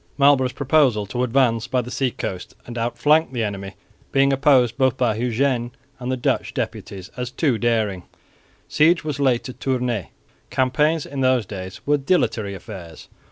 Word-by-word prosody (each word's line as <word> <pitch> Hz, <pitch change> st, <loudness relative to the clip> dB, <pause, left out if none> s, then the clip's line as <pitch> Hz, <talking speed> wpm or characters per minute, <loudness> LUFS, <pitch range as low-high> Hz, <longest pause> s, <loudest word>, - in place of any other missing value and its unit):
Marlborough's 140 Hz, -3 st, +4 dB
proposal 135 Hz, -7 st, +2 dB
to 120 Hz, +5 st, -3 dB
advance 120 Hz, -2 st, +2 dB
by 130 Hz, 0 st, 0 dB
the 125 Hz, 0 st, -4 dB
sea 135 Hz, -1 st, 0 dB
coast 95 Hz, -5 st, -6 dB
and 120 Hz, -, -8 dB
outflank 125 Hz, +7 st, +2 dB
the 120 Hz, -3 st, -2 dB
enemy 100 Hz, -2 st, -5 dB, 0.4 s
being 135 Hz, 0 st, +3 dB
opposed 130 Hz, -4 st, +4 dB
both 130 Hz, -1 st, +2 dB
by 120 Hz, -3 st, +2 dB
Eugene 120 Hz, +1 st, 0 dB, 0.3 s
and 125 Hz, 0 st, -3 dB
the 130 Hz, -, -1 dB
Dutch 125 Hz, -, -1 dB
deputies 95 Hz, -3 st, -5 dB
as 125 Hz, -1 st, -3 dB
too 130 Hz, -3 st, 0 dB
daring, 110 Hz, -6 st, 0 dB, 0.7 s
siege 165 Hz, +2 st, +3 dB
was 150 Hz, -2 st, -4 dB
laid 130 Hz, -4 st, +2 dB
to 130 Hz, -, -7 dB
Tournay. 125 Hz, -7 st, -2 dB, 0.4 s
Campaigns 145 Hz, +5 st, +1 dB
in 140 Hz, -1 st, -5 dB
those 130 Hz, -3 st, +3 dB
days 95 Hz, -1 st, -8 dB
were 145 Hz, +1 st, +3 dB
dilatory 130 Hz, -, 0 dB
affairs. 90 Hz, -4 st, -10 dB
125 Hz, 160 wpm, -22 LUFS, 115-135 Hz, 0.7 s, Marlborough's